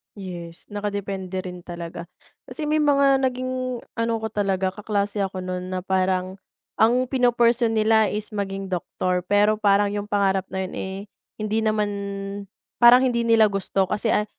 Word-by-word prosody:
Yes, 175 Hz, -4 st, -8 dB
nakadepende 200 Hz, -2 st, -3 dB
rin 180 Hz, -1 st, -7 dB
talaga. 170 Hz, -1 st, -7 dB, 0.4 s
Kasi 315 Hz, -, -5 dB
may 310 Hz, +1 st, +2 dB
mga 280 Hz, -2 st, +4 dB
naging 255 Hz, -1 st, -2 dB, 0.2 s
ano 230 Hz, 0 st, 0 dB
ko 220 Hz, -, -2 dB
talaga, 195 Hz, -2 st, 0 dB
kaklase 205 Hz, 0 st, -2 dB
ako 190 Hz, -1 st, -2 dB
noon 185 Hz, 0 st, -4 dB
na 185 Hz, -1 st, -3 dB
parang 185 Hz, 0 st, 0 dB, 0.4 s
ang 245 Hz, +3 st, +3 dB
pino-pursue 240 Hz, -2 st, +3 dB
nila 220 Hz, 0 st, +4 dB
is 210 Hz, +1 st, -3 dB
maging 195 Hz, -2 st, -4 dB
doctor. 180 Hz, 0 st, -2 dB
Pero 205 Hz, +2 st, +3 dB
parang 205 Hz, -1 st, +3 dB
yung 205 Hz, 0 st, -3 dB
pangarap 195 Hz, -2 st, +1 dB
na 190 Hz, 0 st, -3 dB
yun, 185 Hz, -, -7 dB
eh, 190 Hz, 0 st, -4 dB, 0.5 s
hindi 215 Hz, +1 st, 0 dB
naman, 215 Hz, -1 st, +1 dB, 0.9 s
parang 240 Hz, +1 st, +8 dB
hindi 235 Hz, -2 st, +1 dB
nila 225 Hz, -2 st, +5 dB
gusto 195 Hz, -1 st, -1 dB
kasi, 220 Hz, +2 st, +1 dB
ah, 210 Hz, -, +2 dB
205 Hz, 155 wpm, -23 LUFS, 190-230 Hz, 0.9 s, parang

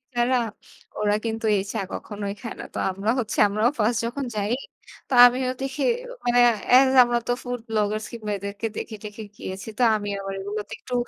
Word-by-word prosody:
ছাড়া 245 Hz, +1 st, +3 dB, 0.6 s
ওরা 210 Hz, 0 st, +2 dB
কিন্তু 225 Hz, 0 st, -2 dB
এই 190 Hz, -, 0 dB
চা 220 Hz, -, -1 dB
কখনোই 205 Hz, -1 st, -5 dB
খায় 230 Hz, -, -6 dB
না। -, -, -6 dB
তো -, -, -6 dB
আমরা 195 Hz, +4 st, -1 dB
হচ্ছে 225 Hz, -4 st, -3 dB
আমরাও 215 Hz, +4 st, +2 dB
ফার্স্ট 220 Hz, +1 st, +2 dB
যখন 265 Hz, +4 st, -3 dB
যাই 205 Hz, +1 st, -1 dB, 0.6 s
তো -, -, -2 dB
আমিও 255 Hz, +1 st, +3 dB
দেখি 270 Hz, +2 st, -2 dB, 0.4 s
মানে 245 Hz, 0 st, +4 dB, 0.4 s
এস 265 Hz, +1 st, +7 dB
আমরা 240 Hz, 0 st, +1 dB
তো 245 Hz, -, +1 dB
ফুড 245 Hz, 0 st, -3 dB
ব্লগার্স 215 Hz, 0 st, 0 dB
কিংবা 215 Hz, -3 st, -5 dB
এদেরকে 200 Hz, +3 st, -4 dB
দেখে-টেখে 215 Hz, -1 st, -7 dB
গিয়েছি। 190 Hz, +3 st, -6 dB
তো 250 Hz, -, +2 dB
আমি 205 Hz, -1 st, -3 dB
আবার 195 Hz, 0 st, -5 dB
এগুলোতে 205 Hz, +2 st, -5 dB
একটু 250 Hz, -, -9 dB
220 Hz, 180 wpm, -24 LUFS, 205-245 Hz, 0.6 s, এস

